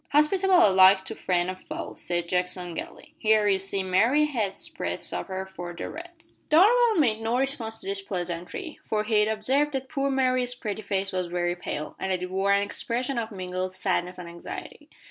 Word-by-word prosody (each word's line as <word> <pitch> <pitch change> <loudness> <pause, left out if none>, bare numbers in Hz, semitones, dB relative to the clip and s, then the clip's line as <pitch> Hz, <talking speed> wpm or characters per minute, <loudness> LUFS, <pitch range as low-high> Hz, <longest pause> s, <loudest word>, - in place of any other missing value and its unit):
"Hospitable 360 - +5
alike 190 0 +6
to - - -5
friend 175 -1 0
and 185 0 -5
foe," - - -6
said 175 -1 -3
Jackson 180 0 -2
gaily. - - -8
"Here, 215 -1 +3
you 195 -1 +3
see, 195 0 -1
Mary 230 +11 +3
has 220 -10 -1
spread - - -3
supper 190 0 -3
for 175 -2 -8
the - - -5
Reds!" 335 0 -11
Darvall 440 +7 +5
made 225 -8 +2
no 225 +2 0
response 255 -4 -2
to - - -10
this 395 0 -2
pleasantry, 180 - -5
for 210 -1 -1
he 215 -1 +3
observed 265 +7 +1
that 265 -1 -3
poor 275 -2 0
Mary's 255 -2 +1
pretty 215 -3 -4
face 195 -1 -2
was 185 -2 -2
very 175 0 -1
pale, 155 -3 -5
and 190 - -2
that 180 -1 -1
it 180 - -5
wore 195 +1 +1
an 200 0 +4
expression 245 +5 -2
of 225 -1 -3
mingled 185 -1 -4
sadness 185 -1 -1
and 180 -1 -8
anxiety. 170 0 -9
205 Hz, 190 wpm, -26 LUFS, 185-270 Hz, -, alike